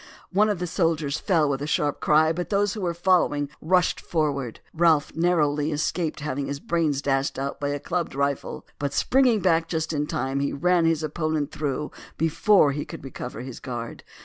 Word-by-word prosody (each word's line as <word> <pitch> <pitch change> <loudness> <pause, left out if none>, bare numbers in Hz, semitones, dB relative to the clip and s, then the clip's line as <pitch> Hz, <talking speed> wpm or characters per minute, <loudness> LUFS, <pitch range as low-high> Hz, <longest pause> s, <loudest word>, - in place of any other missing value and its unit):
One 210 +3 +3
of 205 - 0
the 180 - -3
soldiers 165 -4 0
fell 165 -7 +2
with 140 -1 -1
a 145 - -3
sharp 150 -1 0
cry, 155 +1 +4
but 175 +2 -4
those 205 -1 +1
who 215 - -5
were 175 -2 -1
following 170 -5 +2
rushed 180 +2 +2
forward. 140 -7 -2
Ralph 160 -3 +3
narrowly 155 -3 +1
escaped 155 +1 -2
having 140 -1 -3
his 140 0 -4
brains 155 -4 0
dashed 135 0 0
out 135 +1 -3
by 145 - -1
a 145 0 -2
clubbed 170 -1 -3
rifle, 140 0 -2
but 140 -1 -2
springing 250 - +3
back 165 -3 +2
just 160 -1 -2
in 150 0 -1
time 135 0 -2
he 140 - -1
ran 175 +3 +2
his 165 -1 +1
opponent 155 -1 -1
through 150 0 -3 0.3
before 165 +1 +4
he 145 +1 -3
could - - -9
recover 125 -3 -7
his 130 -1 -8
guard. 120 -2 -6
155 Hz, 190 wpm, -25 LUFS, 140-170 Hz, 0.3 s, cry